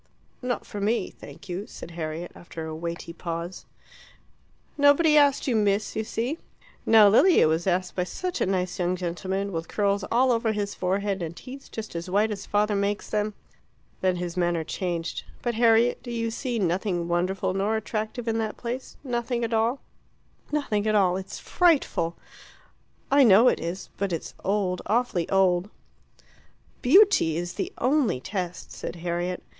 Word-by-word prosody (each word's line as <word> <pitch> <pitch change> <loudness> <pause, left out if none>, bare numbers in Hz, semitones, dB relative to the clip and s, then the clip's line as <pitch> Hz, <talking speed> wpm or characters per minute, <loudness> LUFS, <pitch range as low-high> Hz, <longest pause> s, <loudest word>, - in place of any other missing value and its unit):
"Not 250 -1 -2
for 205 - -6
me, 210 -1 0
thank - - -13
you," 190 +4 -4
said 170 - -10
Harriet, 165 +1 -5
after 165 -2 -8
a 160 0 -5
weighty 170 +1 -5
pause. 170 +1 -5 1.1
"Nobody 290 +2 +5
asked 285 -2 +4
you, 250 - +2
Miss, 205 -1 +1
you 220 - -1
see. 245 +9 -3 0.5
Now 220 -2 +8
Lilia 275 - +6
was 160 +3 0
asked 185 0 0
by 180 - 0
such 360 - -4
a - - +2
nice 185 -1 -1
young 180 0 +1
gentleman, 185 +3 -3
with 165 -1 -4
curls 200 -1 0
all 255 +2 +4
over 230 -2 +1
his 205 -1 -2
forehead, 195 +1 -1
and 170 0 -4
teeth 270 +1 -10
just 220 -5 -7
as 170 +2 -4
white 210 +4 +2
as 205 -1 -6
father 210 0 +1
makes 200 +1 -1
them." 210 -1 -1 0.7
Then 185 -1 +2
his 175 0 -4
manner 175 -2 +1
changed. 170 0 -3 0.2
"But, 240 - 0
Harriet, 230 +1 +4
do 245 - -9
you 230 -1 -2
see 245 +1 -3
nothing 180 -2 0
wonderful 185 +2 0
or 215 +3 +1
attractive 220 +2 -4
in 225 0 +1
that 220 -1 -3
place 245 +2 -5
nothing 240 -2 -2
at 230 0 -2
all?" 230 +4 +1 0.7
"Nothing 220 -9 0
at 215 - +2
all. 185 -3 +4
It's 190 0 -6
frightful." 290 - +2 1.0
"I 280 0 +6
know 225 +2 +7
it - - 0
is. 170 +4 -5
But 200 -1 -1
it's 165 - -4
old 195 -2 0
awfully 215 -5 0
old." 190 -1 +3 1.1
"Beauty 300 - +5
is 175 0 -3
the 380 - -3
only 255 - +2
test," 180 +2 -5
said - - -6
Harriet. 175 +1 -3
200 Hz, 165 wpm, -26 LUFS, 180-230 Hz, 1.1 s, Now